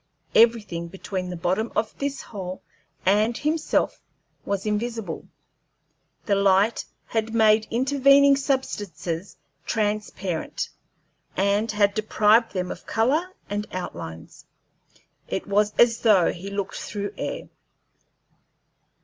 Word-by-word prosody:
Everything 210 -8 +3
between 185 +1 -5
the 180 - -4
bottom 185 +7 0
of 215 0 -1
this 280 -1 -3
hole 185 -4 -7 0.4
and 210 +5 +3
himself 310 +1 0 0.4
was 200 0 -2
invisible; 225 +1 -3 1.0
the 205 - +1
light 200 +2 +3 0.2
had 225 0 -2
made 220 -1 +4
intervening 275 +2 +5
substances 200 - -3 0.3
transparent, 205 -5 -2 0.7
and 200 +3 +2
had 205 -1 +3
deprived 215 +1 +3
them 180 -2 -2
of - - -9
color 295 +11 +1 0.2
and 205 +1 -3
outlines. 80 - -7 0.8
It - - -3
was 205 +1 +2
as 235 -1 +5
though 205 -6 +4
he 185 +3 -7
looked 200 -1 -4
through 205 0 -4
air. - - -5
210 Hz, 105 wpm, -24 LUFS, 195-230 Hz, 1.0 s, intervening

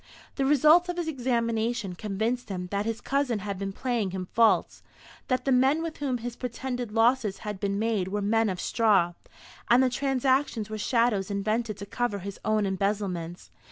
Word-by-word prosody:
The 270 -1 0
result 310 +5 +5
of 355 - -3
his 345 -2 -2
examination 235 - -1
convinced 220 +6 -2
him 180 -2 -4
that 200 +2 -1
his 225 0 -3
cousin 275 -4 0
had 200 -1 -5
been 195 0 -3
playing 235 -2 -1
him 185 -1 -5
false; 220 -6 +3 0.5
that 255 -1 0
the 270 - +2
men 265 +5 +3
with 325 -1 -5
whom 270 -4 -1
his 235 0 -6
pretended 245 -1 -4
losses 225 -2 +2
had 210 -2 -4
been 200 0 -1
made 215 -4 0
were 205 +2 -2
men 225 +1 +2
of 185 -2 -3
straw, 200 -7 +2 0.6
and 245 +2 +6
the 255 - +2
transactions 260 -4 0
were 215 - -4
shadows 230 -4 +1
invented 215 +2 -1
to 200 - -7
cover 240 0 -2
his 200 +1 -7
own 215 -1 +1
embezzlements. 190 -3 -2
225 Hz, 180 wpm, -27 LUFS, 200-250 Hz, 0.6 s, and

